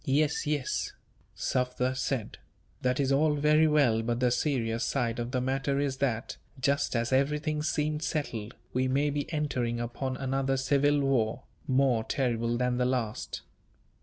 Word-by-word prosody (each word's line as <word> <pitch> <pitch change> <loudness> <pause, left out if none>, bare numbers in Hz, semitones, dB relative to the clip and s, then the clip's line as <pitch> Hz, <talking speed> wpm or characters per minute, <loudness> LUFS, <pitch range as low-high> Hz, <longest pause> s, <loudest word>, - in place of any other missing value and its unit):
"Yes, 145 +2 +1
yes," 145 -3 -1 0.4
Sufder 125 0 0
said; 130 -3 -2 0.4
"that 125 +1 +1
is 140 -1 +1
all 150 +2 +3
very 150 +2 +4
well, 140 -7 +3
but 120 +1 -1
the 125 -1 +3
serious 120 -4 0
side 120 -4 -1
of 120 0 -2
the 130 0 -1
matter 135 +2 0
is 140 -2 -1
that, 125 -4 -1 0.2
just 140 +1 +1
as 115 +2 0
everything 150 +3 +1
seemed 150 0 -1
settled, 125 -9 -3 0.2
we 130 +1 +1
may 140 +3 +1
be 145 +2 -3
entering 125 -7 -1
upon 125 +2 -3
another 135 0 0
civil 145 +2 +2
war, 125 -5 +1 0.2
more 130 -4 +3
terrible 120 -2 0
than 125 0 0
the 125 - +2
last. 125 -4 -2
130 Hz, 155 wpm, -29 LUFS, 120-145 Hz, 0.4 s, very